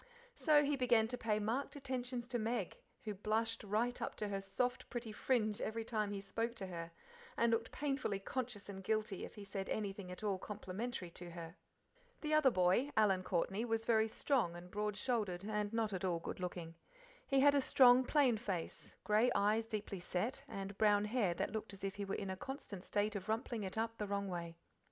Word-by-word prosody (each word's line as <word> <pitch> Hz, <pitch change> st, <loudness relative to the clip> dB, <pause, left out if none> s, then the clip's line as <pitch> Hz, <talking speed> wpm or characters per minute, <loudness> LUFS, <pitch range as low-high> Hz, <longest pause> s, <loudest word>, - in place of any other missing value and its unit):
So 305 Hz, -10 st, +5 dB
he 290 Hz, 0 st, +2 dB
began 240 Hz, -4 st, +4 dB
to 250 Hz, -, -2 dB
pay 215 Hz, -2 st, +1 dB
marked 225 Hz, +8 st, -1 dB
attentions 255 Hz, -3 st, -3 dB
to 240 Hz, -1 st, 0 dB
Meg, 225 Hz, -3 st, -2 dB, 0.2 s
who 215 Hz, -, -3 dB
blushed 220 Hz, +3 st, 0 dB
right 220 Hz, +4 st, 0 dB
up -, -, -2 dB
to 210 Hz, -, -3 dB
her 195 Hz, -1 st, -2 dB
soft, 220 Hz, +6 st, -1 dB
pretty 235 Hz, -3 st, -4 dB
fringe 215 Hz, -2 st, +1 dB
every 225 Hz, +1 st, -2 dB
time 215 Hz, -3 st, 0 dB
he 200 Hz, -, -3 dB
spoke 225 Hz, +4 st, -2 dB
to 200 Hz, -, -4 dB
her, 170 Hz, -2 st, -6 dB, 0.5 s
and 235 Hz, 0 st, +4 dB
looked 230 Hz, 0 st, 0 dB
painfully 275 Hz, -8 st, -1 dB
conscious 225 Hz, 0 st, -4 dB
and 195 Hz, -1 st, -7 dB
guilty 215 Hz, -1 st, -1 dB
if -, -, -11 dB
he 205 Hz, -, -8 dB
said 195 Hz, -1 st, -4 dB
anything 200 Hz, -3 st, -3 dB
at 180 Hz, -, -8 dB
all 200 Hz, -3 st, 0 dB
complimentary 205 Hz, -1 st, -5 dB
to 175 Hz, +1 st, -7 dB
her. 165 Hz, 0 st, -8 dB, 0.7 s
The 305 Hz, 0 st, -1 dB
other 305 Hz, -3 st, +6 dB
boy, 185 Hz, +6 st, +3 dB
Alan 195 Hz, -4 st, +4 dB
Courtney, 190 Hz, +4 st, 0 dB
was 225 Hz, -1 st, -1 dB
very 220 Hz, -1 st, +4 dB
tall 225 Hz, -, +1 dB
and 175 Hz, +1 st, -10 dB
broad 210 Hz, 0 st, -1 dB
shouldered, 210 Hz, -8 st, -1 dB
and 210 Hz, -1 st, -1 dB
not 225 Hz, -2 st, 0 dB
at 185 Hz, -, -3 dB
all 180 Hz, -3 st, +1 dB
good 165 Hz, -, -5 dB
looking. 175 Hz, -2 st, -4 dB, 0.5 s
He 275 Hz, -2 st, +4 dB
had 285 Hz, +1 st, +7 dB
a 285 Hz, -, +4 dB
strong, 255 Hz, -1 st, +7 dB
plain 260 Hz, -4 st, +4 dB
face, 195 Hz, -7 st, -4 dB
grey 215 Hz, +4 st, +4 dB
eyes 215 Hz, +3 st, +3 dB
deeply 205 Hz, -3 st, -4 dB
set, 185 Hz, +9 st, -2 dB
and 195 Hz, -4 st, -5 dB
brown 210 Hz, -1 st, +5 dB
hair 210 Hz, -6 st, +1 dB
that -, -, -1 dB
looked 220 Hz, -2 st, -4 dB
as 195 Hz, -, -10 dB
if 195 Hz, -1 st, -1 dB
he 200 Hz, -, -2 dB
was 195 Hz, -, -2 dB
in 195 Hz, -2 st, -3 dB
a -, -, -2 dB
constant 205 Hz, -4 st, -6 dB
state 210 Hz, +1 st, 0 dB
of 195 Hz, 0 st, -5 dB
rumpling 225 Hz, 0 st, -1 dB
it 190 Hz, +2 st, -5 dB
up 225 Hz, 0 st, -1 dB
the 210 Hz, -, -1 dB
wrong 200 Hz, 0 st, -1 dB
way. 170 Hz, -2 st, -4 dB
215 Hz, 205 wpm, -37 LUFS, 195-235 Hz, 0.7 s, had